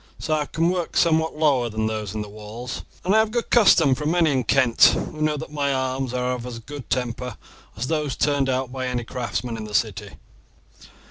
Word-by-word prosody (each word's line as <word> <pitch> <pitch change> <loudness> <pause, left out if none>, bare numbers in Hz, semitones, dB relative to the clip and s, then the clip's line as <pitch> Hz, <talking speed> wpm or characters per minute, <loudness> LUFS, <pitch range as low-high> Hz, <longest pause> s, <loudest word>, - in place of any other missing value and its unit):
So 155 - -2
I 150 -2 0
can 165 +2 +1
work 180 -2 -2
somewhat 160 -1 +2
lower 140 -6 +2
than 110 0 -2
those 110 -2 -3
in 105 - -2
the - - -9
walls, 110 +4 -7 0.2
and 190 - +2
I - - +6
have 220 0 +2
good 235 +1 -3
custom 175 - +6
from 150 +3 -2
many 165 -2 +3
in 130 -2 +1
Kent, 120 0 +1 0.3
who 155 - -8
know 155 -1 +1
that 145 - -7
my 145 -2 0
arms 130 -1 -1
are 125 0 -1
of 125 -1 -5
as 120 -2 -6
good 135 +4 -9
temper 125 -1 -2 0.4
as 115 - -2
those 150 -2 -1
turned 140 -2 +1
out 130 -1 -1
by 130 -1 -3
any 125 -1 -2
craftsman 120 0 -4
in 110 - -6
the 105 -1 -6
city." - - -1
130 Hz, 215 wpm, -23 LUFS, 120-155 Hz, 0.4 s, I